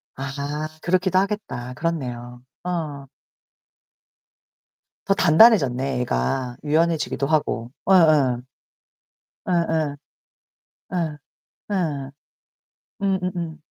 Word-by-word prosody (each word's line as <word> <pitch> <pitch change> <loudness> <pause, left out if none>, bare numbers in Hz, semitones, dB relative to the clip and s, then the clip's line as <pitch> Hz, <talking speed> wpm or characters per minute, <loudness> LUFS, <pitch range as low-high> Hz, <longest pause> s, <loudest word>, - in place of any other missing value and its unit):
아 140 +3 -4
그렇기도 185 +1 +2
하겠다. 195 - -3
그렇네요. 125 -6 -4 0.2
어. 155 -6 -4 2.0
더 195 - +5
단단해졌네, 140 - +4
애가. 125 - -1
유연해지기도 155 -2 +1
하고. 125 -6 0 0.2
예예. 155 -9 +5 1.1
예예. 160 -4 +1 1.0
예. 160 -4 -2 0.5
예. 150 -8 -1 0.9
음음음. 180 -4 -1
155 Hz, 165 characters per minute, -23 LUFS, 135-175 Hz, 2.0 s, 더